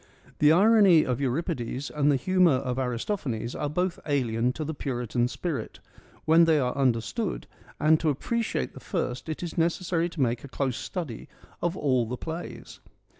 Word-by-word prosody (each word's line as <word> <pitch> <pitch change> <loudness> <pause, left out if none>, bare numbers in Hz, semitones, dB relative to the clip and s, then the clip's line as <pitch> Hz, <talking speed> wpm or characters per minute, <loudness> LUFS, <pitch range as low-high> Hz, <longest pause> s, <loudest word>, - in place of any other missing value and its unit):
The 150 0 +6
irony 195 -2 +6
of 125 0 -1
Euripides 135 -1 -2
and 150 -1 +2
the - - +3
humour 180 +4 +3
of 130 -1 -2
Aristophanes 125 - -2
are 145 - -2
both 180 +3 -1
alien 125 -4 +1
to 155 - -4
the 160 - -3
Puritan 125 -4 -1
spirit, 140 -3 -4 0.5
when 165 +2 +6
they 160 -1 +4
are 125 -2 0
understood, 140 - -1 0.3
and 155 +1 +4
to 160 - +1
appreciate 185 - -2
the - - -10
first 125 +5 -3
it 155 - -4
is 170 0 -4
necessary 170 0 0
to 170 - -10
make 120 -3 0
a - - -7
close 135 -2 -2
study 160 - -6 0.3
of 175 +2 -1
all 130 -5 +1
the 125 +2 -4
plays. 165 +5 -7
145 Hz, 170 wpm, -27 LUFS, 125-170 Hz, 0.5 s, The